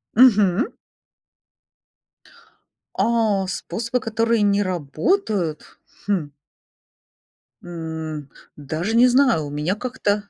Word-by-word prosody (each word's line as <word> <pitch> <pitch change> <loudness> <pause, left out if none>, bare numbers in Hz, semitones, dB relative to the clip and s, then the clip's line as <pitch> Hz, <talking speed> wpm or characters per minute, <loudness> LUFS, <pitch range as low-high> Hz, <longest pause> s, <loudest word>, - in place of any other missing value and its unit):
Мгм. 215 - +4 2.2
А, 220 -5 +1
способы, 235 +6 -3
которые 225 0 0
не 205 0 +3
работают? 185 - -2 0.3
Хм. 170 -8 -1 1.3
М, 160 -4 -6 0.3
даже 160 +9 -3
не 245 +2 +6
знаю, 250 - +3
у 145 - -7
меня 150 +6 -1
как-то 210 -4 -2
200 Hz, 80 wpm, -22 LUFS, 160-230 Hz, 2.2 s, не